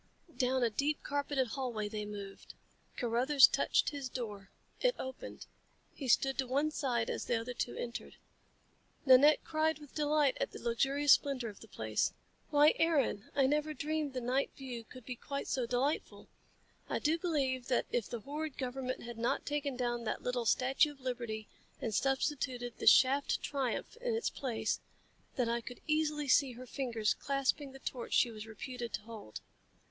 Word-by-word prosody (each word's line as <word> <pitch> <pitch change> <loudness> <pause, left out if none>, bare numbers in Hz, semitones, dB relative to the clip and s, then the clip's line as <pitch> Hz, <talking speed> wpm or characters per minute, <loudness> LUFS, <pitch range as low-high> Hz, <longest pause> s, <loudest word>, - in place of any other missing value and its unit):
Down 255 -1 +1
a 235 - +2
deep 285 +7 0
carpeted 285 -3 0
hallway 235 -4 -2
they 210 0 -4
moved. 200 -1 -8 0.4
Carruthers 255 +4 +6
touched - - +2
his 280 -3 -5
door. 210 -6 -6 0.3
It - - +2
opened. 260 0 -7 0.5
He 275 - -6
stood 270 +2 +3
to 260 - +1
one 285 +4 +1
side 245 -6 0
as - - -3
the 235 - +1
other 240 +2 -5
two 245 - -3
entered. 235 0 -5 0.9
Nanette 275 +3 +7
cried 315 0 +1
with 295 -3 -14
delight 295 -2 +2
at - - -1
the - - -7
luxurious 270 +5 +2
splendor 265 -5 +1
of 205 - -12
the - - -13
place. - - -1 0.4
"Why, 295 +1 +6
Aaron, 295 -11 +1
I 275 -2 +4
never 300 +2 +1
dreamed 305 -2 -2
the 255 - -3
night 255 +3 +1
view 250 -4 -6
could 250 +1 -13
be 250 - -4
quite 280 +3 -5
so 250 -3 -1
delightful! 255 +5 -1 0.6
I - - 0
do 320 +3 +1
believe 270 -7 0
that 250 - +2
if 240 -4 -1
the 235 -2 -4
horrid 295 +3 -5
government 255 0 -3
had 235 -1 -7
not 235 - 0
taken 290 -2 -2
down 240 -1 -1
that - - -2
little 245 -2 -1
Statue 270 +6 +3
of 280 - -22
Liberty 235 -4 -4 0.3
and 225 - -3
substituted 260 -2 -1
the - - -3
Shaft 275 +2 +5
Triumph 275 - -2
in 485 -1 -1
its 455 - -1
place, 225 -5 -2 0.6
that 250 -2 +1
I 235 +1 0
could 245 +1 -9
easily 305 -1 0
see 265 -1 +4
her 250 +2 -9
fingers 235 -5 0
clasping 275 +1 -1
the 270 - -11
torch 250 -3 -5
she 240 - +4
was 215 0 -8
reputed 235 +1 -6
to - - -2
hold. 215 - -9
260 Hz, 175 wpm, -33 LUFS, 235-285 Hz, 0.9 s, Nanette